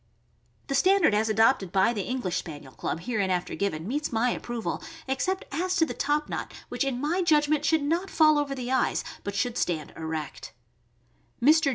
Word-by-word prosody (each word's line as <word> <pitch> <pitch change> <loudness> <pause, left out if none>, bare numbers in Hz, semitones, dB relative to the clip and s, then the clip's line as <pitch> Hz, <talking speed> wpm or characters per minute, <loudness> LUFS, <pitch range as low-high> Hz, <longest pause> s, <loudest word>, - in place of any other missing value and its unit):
The 275 - -3
standard 375 - +4
as 215 +1 +2
adopted 215 -3 +3
by 195 +5 +3
the 210 - -2
English 225 -5 -2
Spaniel 145 -4 -7
Club, 165 - -3
hereinafter 190 -4 -1
given, 175 -4 -2
meets 290 +5 -2
my 240 +2 +2
approval, 240 -1 -4 0.3
except 370 +9 -1
as 365 +5 -1
to 325 - +4
the - - -5
top 295 +1 0
knot, - - -4 0.2
which - - -1
in 270 -3 -1
my 320 +7 0
judgment 300 -3 +3
should 310 +1 +3
not 340 +6 0
fall 310 -3 +5
over 280 -1 -2
the 250 -1 -4
eyes, 260 -1 +1 0.2
but 200 0 -4
should 245 +2 0
stand 155 -4 -2
erect. 160 -9 -5 0.9
Mr. 305 +3 +5
255 Hz, 180 wpm, -27 LUFS, 200-300 Hz, 0.9 s, fall